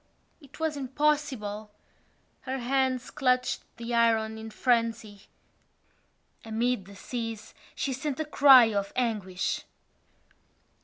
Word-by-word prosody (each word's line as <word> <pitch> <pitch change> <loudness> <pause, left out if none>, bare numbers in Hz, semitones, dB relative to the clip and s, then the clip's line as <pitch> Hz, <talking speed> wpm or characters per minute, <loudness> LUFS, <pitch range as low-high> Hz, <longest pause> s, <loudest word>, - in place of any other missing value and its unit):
It 280 +1 -16
was 320 -2 -1
impossible. 265 -6 -1 0.7
Her 265 0 -4
hands 255 0 0
clutched 255 -2 +1 0.2
the 235 +1 -5
iron 220 -1 +2
in 220 0 -7
frenzy. 230 -3 -1 1.2
Amid 225 -1 -1
the 200 +1 -13
seas 225 0 -6 0.2
she 270 - -2
sent 270 +2 -4
a 315 - -1
cry 265 -6 +7
of 200 -1 -1
anguish! 210 -7 -1
240 Hz, 105 wpm, -28 LUFS, 220-265 Hz, 1.2 s, cry